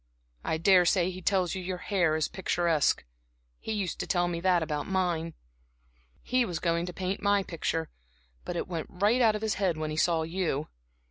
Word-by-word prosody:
I 160 - 0
daresay 180 +1 +4
he 185 0 -8
tells 185 -2 +1
you 190 - -4
your 180 0 -3
hair's 170 -6 +1
picturesque 170 -5 +1 0.5
he - - -5
used 200 -5 -2
to - - -3
tell 175 -1 +2
me 170 -1 -2
that 180 -1 +3
about 150 -2 -3
mine. 175 -4 -1 0.9
He 255 0 +2
was 180 -7 -3
going 170 +1 0
to - - -4
paint 185 +2 -3
my 200 -1 +3
picture, 165 -2 -3 0.5
but 175 - -5
it - - -2
went 165 -4 -4
out 225 0 +4
of 210 - -4
his 220 -1 +1
head 180 -5 +1
when 155 -1 -3
he 155 - -4
saw 165 -1 +2
you. 165 -3 -2
175 Hz, 185 wpm, -29 LUFS, 165-190 Hz, 0.9 s, daresay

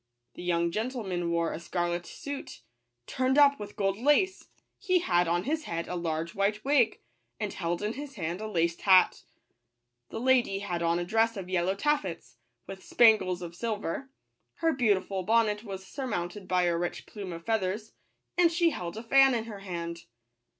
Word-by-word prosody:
The - - -10
young 170 -1 +1
gentleman 210 -6 -2
wore 170 0 0
a - - -5
scarlet 175 0 -2
suit, 280 - -7 0.4
turned 260 - 0
up 285 -1 +6
with 205 0 -8
gold 195 0 0
lace; 295 +9 +2 0.3
he 370 -3 +2
had 175 - +2
on 175 +1 +1
his 310 +2 -2
head 170 0 -3
a - - -4
large 165 -1 -2
white 210 +3 0
wig, 270 -6 +3 0.4
and 210 -2 -3
held 170 +2 -2
in 210 +2 -1
his 285 +1 -8
hand 175 0 -3
a 220 - -4
laced 170 -4 0
hat. 185 -2 +5 0.9
The - - -5
lady 245 -5 +3
had 180 -4 -3
on 170 0 +2
a 175 - -2
dress 225 +3 +1
of 185 -2 -6
yellow 185 +1 +1
taffeta, 200 - -1 0.4
with 195 -1 -9
spangles 190 -6 +4
of 170 -1 -7
sil 220 +4 -2
ver; 210 +7 -5 0.5
her 330 -1 +1
beautiful 200 -6 +1
bonnet 215 +1 +2
was 190 -3 -7
surmounted 195 -6 -4
by 180 -1 +2
a 175 -1 +2
rich 175 +1 -3
plume 200 -4 -7
of 170 0 -8
feathers, 215 0 -1 0.5
and 340 -2 +5
she 340 0 +3
held 175 - -5
a 225 - -6
fan 270 +2 +5
in 225 - -1
her 220 -3 -8
hand. 170 -3 -6
195 Hz, 180 wpm, -29 LUFS, 175-235 Hz, 0.9 s, up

